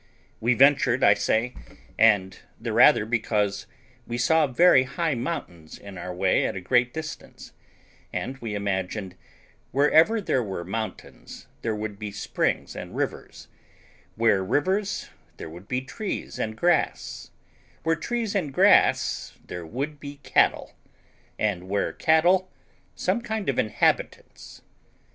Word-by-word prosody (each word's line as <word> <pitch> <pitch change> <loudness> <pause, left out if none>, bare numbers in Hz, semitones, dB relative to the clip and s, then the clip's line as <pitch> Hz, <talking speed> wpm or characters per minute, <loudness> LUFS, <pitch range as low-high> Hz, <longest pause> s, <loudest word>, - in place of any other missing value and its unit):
We 120 +2 +2
ventured, 135 -1 +4
I 100 - +7
say, 115 +4 0 0.4
and 100 -4 +3 0.2
the - - -4
rather - - +6
because 105 -3 -1 0.4
we 120 - -3
saw 160 +5 +3
very 140 +2 +5
high 145 +5 -1
mountains 115 - -5
in 100 -1 -11
our 90 0 -6
way 90 +1 +1
at - - -4
a - - -3
great 120 +6 +2
distance, 160 +2 -8 0.6
and 130 - -4
we 110 -4 -5
imagined, 95 -1 -3 0.6
wherever 160 - +4
there 135 -10 0
were 95 -6 -5
mountains 110 +4 -7 0.2
there 110 -2 -2
would 105 -1 -5
be 105 -1 -5
springs 105 - -2
and - - -8
rivers; - - -5 0.7
where 110 -4 +2
rivers 190 - -1 0.3
there 80 - -8
would 90 +4 -12
be 125 0 -1
trees 200 +10 -5
and 110 0 -3
grass; 175 +5 0 0.5
where 165 0 +2
trees 225 +5 -3
and 155 -9 -2
grass - - +3
there 85 -2 -7
would 140 - -4
be 145 0 -8
cattle; - - +2 0.6
and 95 -4 -2
where 100 0 -1
cattle, 180 +4 +3 0.4
some 235 - 0
kind 220 -5 -3
of 135 - 0
inhabitants. 110 - -1
120 Hz, 135 wpm, -25 LUFS, 100-155 Hz, 0.7 s, I